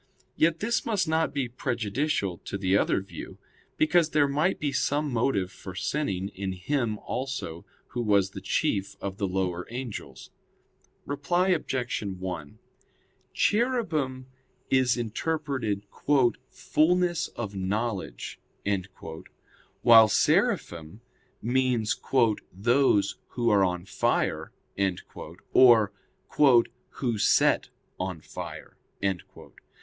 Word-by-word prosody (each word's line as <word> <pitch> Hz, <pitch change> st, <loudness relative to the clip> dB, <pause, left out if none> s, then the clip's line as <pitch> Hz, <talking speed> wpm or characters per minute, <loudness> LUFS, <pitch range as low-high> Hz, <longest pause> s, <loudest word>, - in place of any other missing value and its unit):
Yet 165 Hz, 0 st, +2 dB
this 230 Hz, +2 st, 0 dB
must 210 Hz, -7 st, 0 dB
not 160 Hz, -1 st, +1 dB
be 140 Hz, -3 st, -1 dB
prejudicial 120 Hz, -, -2 dB
to 95 Hz, -, -4 dB
the 95 Hz, -1 st, +1 dB
other 100 Hz, -, +2 dB
view; 95 Hz, -, -9 dB, 0.4 s
because 165 Hz, +1 st, +3 dB
there 150 Hz, -2 st, +3 dB
might 150 Hz, +7 st, +1 dB
be 145 Hz, -2 st, -1 dB
some 145 Hz, +1 st, 0 dB
motive 110 Hz, -6 st, +1 dB
for 95 Hz, -3 st, -10 dB
sinning 95 Hz, -3 st, -2 dB
in 95 Hz, -1 st, -4 dB
him 110 Hz, +3 st, -1 dB
also 125 Hz, -11 st, -5 dB, 0.2 s
who 120 Hz, -, -3 dB
was 100 Hz, -4 st, +2 dB
the -, -, -8 dB
chief 100 Hz, -1 st, -1 dB
of 95 Hz, -1 st, -5 dB
the 100 Hz, -, -1 dB
lower 90 Hz, -1 st, -2 dB
angels. 120 Hz, -2 st, -7 dB, 0.7 s
Reply 175 Hz, +7 st, 0 dB
Obj. 130 Hz, -8 st, -1 dB
1: 95 Hz, -6 st, -5 dB, 0.7 s
Cherubim 170 Hz, -, 0 dB, 0.5 s
is 130 Hz, -2 st, +3 dB
interpreted 120 Hz, -3 st, -2 dB, 0.6 s
"fulness 175 Hz, +1 st, +1 dB
of 105 Hz, -4 st, -5 dB
knowledge," 95 Hz, -, -3 dB, 1.4 s
while 115 Hz, -1 st, +9 dB
"Seraphim" 85 Hz, -1 st, +1 dB, 0.4 s
means 120 Hz, -2 st, +1 dB, 0.6 s
"those 105 Hz, 0 st, +2 dB
who 120 Hz, -1 st, 0 dB
are 100 Hz, -2 st, +5 dB
on 90 Hz, -1 st, -1 dB
fire," -, -, 0 dB, 1.0 s
or 115 Hz, -5 st, +7 dB, 1.0 s
"who 120 Hz, -4 st, -2 dB
set -, -, +3 dB, 0.3 s
on 95 Hz, -3 st, -3 dB
fire." -, -, -8 dB
120 Hz, 105 wpm, -27 LUFS, 95-145 Hz, 1.4 s, while